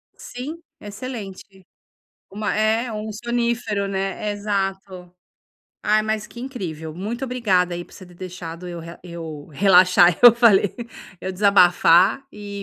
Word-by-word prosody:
Sim, 270 +7 -8 0.2
excelente. 205 -4 -9 0.7
Uma 210 +2 -3
é, 220 +2 0
um 215 0 -5
sonífero, 235 -2 -2
né. 195 +2 -3
Exato. 195 -3 -4 0.7
Ai, 215 +1 +2
mas 215 -1 -2
que 235 - -12
incrível. 170 - -6
Muito 225 +8 -4
obrigada 195 -9 0
aí 175 0 -5
por - - -19
você 185 - -12
ter 180 -1 -17
deixado 180 -1 -8
eu 175 - -7
re 170 +1 -10
eu 165 -4 -8
relaxar, 180 0 +5
eu 240 -2 +10
falei. 215 -5 +4 0.5
Eu 190 - -4
desabafar 185 +2 +4
e 205 -1 -8
200 Hz, 135 wpm, -22 LUFS, 180-220 Hz, 0.7 s, eu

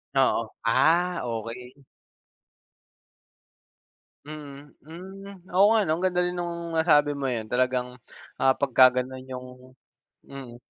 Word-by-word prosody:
Oo. 130 -4 +1
Ah, 170 +9 +3
okey. 125 +4 -7 2.4
Mm.Hmm. 165 +6 -11
Oo 190 +2 +6
nga 220 - +3
'no, 155 - -1
ang - - -5
ganda 180 -1 +1
rin 180 - -1
nung 170 -1 -5
nasabi 150 -3 +4
mong 140 -3 -2
'yan. 110 -1 -5
Talagang, 125 0 -1 0.4
ah, 135 0 +3
pagkaganun 130 -1 +3
yung 125 -1 -7 0.8
mm. 135 -3 -10
140 Hz, 105 wpm, -25 LUFS, 125-175 Hz, 2.4 s, Oo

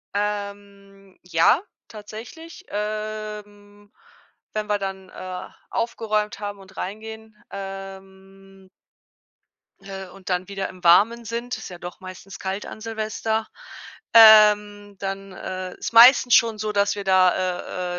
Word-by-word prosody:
Ähm, 200 -1 -5
ja, 175 - +3 0.3
tatsächlich, 225 +10 -11
ähm, 210 -1 -6 0.6
wenn 215 0 -3
wir 210 -1 +1
dann, 190 -1 -6
äh, 185 0 -7 0.2
aufgeräumt 215 -3 -2
haben 205 -1 -6
und 190 0 -16
reingehen, 220 +2 -7 0.2
ähm 195 0 -10 1.1
äh, 195 -1 -8
und 190 0 -12
dann 180 0 -1
wieder 195 -1 -4
im 185 -1 -14
Warmen 220 +7 +5
sind- 235 +2 -4
ist - - -9
ja 175 - -9
doch 175 0 -9
meistens 185 +1 -10
kalt 190 +2 -4
an - - -9
Silvester- 220 0 -2 0.7
ähm, 210 -2 +7
dann, 195 0 -5
äh, 185 0 -6
ist - - -4
meistens 245 +1 +8
schon 225 -2 +3
so, 215 0 -2
dass 200 -1 +1
wir 200 - -5
da 185 -1 +1
200 Hz, 125 wpm, -23 LUFS, 190-215 Hz, 1.1 s, meistens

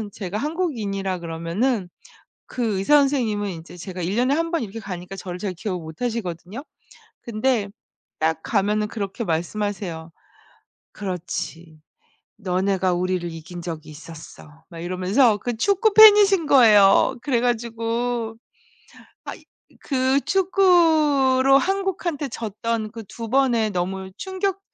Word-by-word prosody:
가면은 210 -2 -6
제가 200 0 -5
한국인이라 215 - -2
그러면은 175 +6 -2 0.6
그 225 -6 -2
의사 295 +10 +4
선생님은 230 -8 0
인제 170 0 -10
제가 185 0 -7
1 180 +4 -2
년에 255 +5 +2
1 330 +2 -1
번 335 -7 0
이렇게 220 +1 -6
가니까 190 -2 -7
저를 180 -1 -7
잘 195 0 -3
기억을 180 0 -4
못 160 0 -11
하시거든요. 220 - -4 0.6
근데 225 -2 -1 0.5
딱 160 0 0
가면은 210 0 0
그렇게 210 +1 -4
말씀하세요. 170 -1 -3 0.8
"그렇지. 170 -4 -6 0.6
너네가 190 -1 0
우리를 180 -1 -1
이긴 165 +2 -9
적이 160 -2 -7
있었어." 155 0 -13
막 165 -2 -10
이러면서 185 +7 +2
그 240 +1 -4
축구 400 - +2
팬이신 410 -5 +7
거예요. 215 -6 +6
그래 245 -5 0
가지고 230 -1 -2 0.9
아 - - -6
이 - - -17 0.4
그 265 0 +1
축구로 310 -8 +4
한국한테 360 -5 -2
졌던 225 0 -4
그 225 - -8
2 230 -1 -7
번의 240 -4 +2
너무 190 +1 -3
충격 385 0 -3
215 Hz, 275 characters per minute, -22 LUFS, 180-265 Hz, 0.9 s, 팬이신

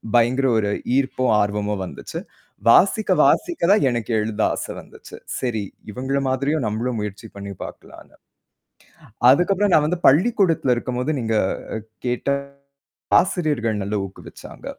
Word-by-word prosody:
பயங்கர 120 +3 +3
ஒரு 105 -2 0 0.3
ஈர்ப்பும், 130 -1 0
ஆர்வமும் 105 0 -1
வந்துச்சு. - - -7 0.5
வாசிக்க, 200 - +4
வாசிக்க 345 - +1
தான் 210 - +4
எனக்கு 120 -1 -3
எழுத 105 0 -2
ஆசை - - -5
வந்துச்சு. - - -13 0.2
சரி, 120 -4 -2 0.3
இவங்கள 130 +5 -2
மாதிரியும் 140 +2 0
நம்மளும் 115 +3 -2
முயற்சி 105 +1 -6
பண்ணி 100 0 -7
பார்க்கலான்னு. - - -12 1.1
அதுக்கப்புறம் 195 +8 +3
நான் 150 - +5
வந்து 175 +4 0
பள்ளிக்கூடத்துல 170 - +3
இருக்கும்போது 125 +3 -2
நீங்கக் 110 -5 0 0.5
கேட்ட 125 +2 -2 0.9
ஆசிரியர்கள் 150 - -1
நல்ல 100 +2 -3
ஊக்கு 95 - -12
வச்சாங்க. - - -12
125 Hz, 120 wpm, -22 LUFS, 110-150 Hz, 1.1 s, நான்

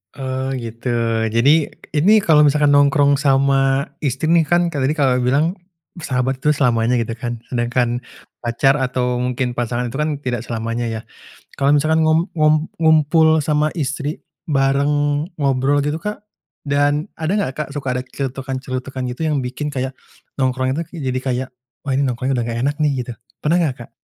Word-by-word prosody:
Oh 130 -1 -3
gitu. 115 0 -6 0.4
Jadi, 140 +8 +3 0.2
ini 160 +8 +4
kalau 155 -2 +5
misalkan 145 0 +3
nongkrong 145 0 +4
sama 135 -1 +3 0.2
istri 145 +2 -1
nih 165 -3 +4
kan, 175 0 +2
kayak 135 -3 0
tadi 150 - 0
Kakak, 135 -4 +2
bilang 155 +9 +1 0.4
sahabat 130 -2 -1
itu 150 +2 +2
selamanya 120 -3 +2
gitu 115 0 -2
kan, 120 -1 -4
sedangkan 120 0 0 0.4
pacar 120 +3 +2
atau 125 -1 -1
mungkin 125 0 -1
pasangan 120 0 -2
itu - - -8
kan 150 +1 +1
tidak 125 -2 -1
selamanya 115 +1 -3
ya. 110 -1 -4 0.6
Kalau 140 0 +3
misalkan 155 +2 +2
ngum 160 +2 +3
ngum 155 0 +3
ngumpul 160 0 +4
sama 150 0 +1
istri, 145 +1 -2 0.3
bareng 145 +2 +1
ngobrol 140 0 +2
gitu 150 +2 -1
Kak, 210 0 -5 0.4
dan 145 +2 +1
ada 160 +1 -3
enggak 165 -10 -1
Kak, - - -16
suka 135 -3 -2
ada 125 - -2
celetukan-celetukan 130 0 -5
gitu 160 - -7
yang 150 - +1
bikin 130 +4 -4
kayak 130 -1 -3 0.4
nongkrong 130 0 0
itu 165 - -2
ke 175 - -9
jadi 130 -3 -2
kayak 130 0 -2 0.4
wah 135 - 0
ini 135 - +2
nongkrongnya, 130 0 -1
udah 120 - 0
enggak 115 0 -3
enak 145 - 0
nih 150 -1 +3
gitu. 125 - -5 0.3
Pernah 170 +3 +2
enggak 140 -6 0
Kak? - - -36
135 Hz, 170 wpm, -19 LUFS, 125-150 Hz, 0.6 s, kalau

